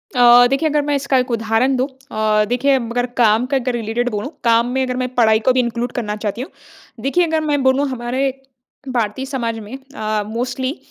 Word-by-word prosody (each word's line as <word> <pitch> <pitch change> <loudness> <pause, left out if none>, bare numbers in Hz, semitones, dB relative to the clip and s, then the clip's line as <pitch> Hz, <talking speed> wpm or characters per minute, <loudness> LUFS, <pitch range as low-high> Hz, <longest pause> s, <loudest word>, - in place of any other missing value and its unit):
अ, 245 0 +7
देखिए 275 +5 +1
अगर 295 0 +1
मैं 290 0 0
इसका 275 -1 +1
एक 250 0 0
उदाहरण 225 +4 +1
दूँ 255 +2 0 0.2
अ, 215 -1 +1
देखिए 270 +3 +2
अगर 245 0 -2 0.2
काम 220 +1 +4
का 275 +1 0
अगर 250 -1 -2
रिलेटेड 235 +1 -1
बोलूँ, 210 +4 -4
काम 235 0 +3
में 265 +1 0
अगर 250 -1 -3
मैं 255 0 -2
पढ़ाई 220 -2 +4
को - - +7
भी 255 - +2
इनक्लूड 240 0 -1
करना 210 -4 -3
चाहती 210 +1 -4
हूँ। 265 - -6 0.5
देखिए 345 +6 +2
अगर 320 0 0
मैं 295 -2 0
बोलूँ 265 +2 +2
हमारे 255 +2 -1 0.6
भारतीय 240 0 -2
समाज 235 -5 -3
में 220 +5 -8 0.2
अ, 215 -1 -1
मोस्टली 255 +5 -3
245 Hz, 205 wpm, -19 LUFS, 225-265 Hz, 0.6 s, अ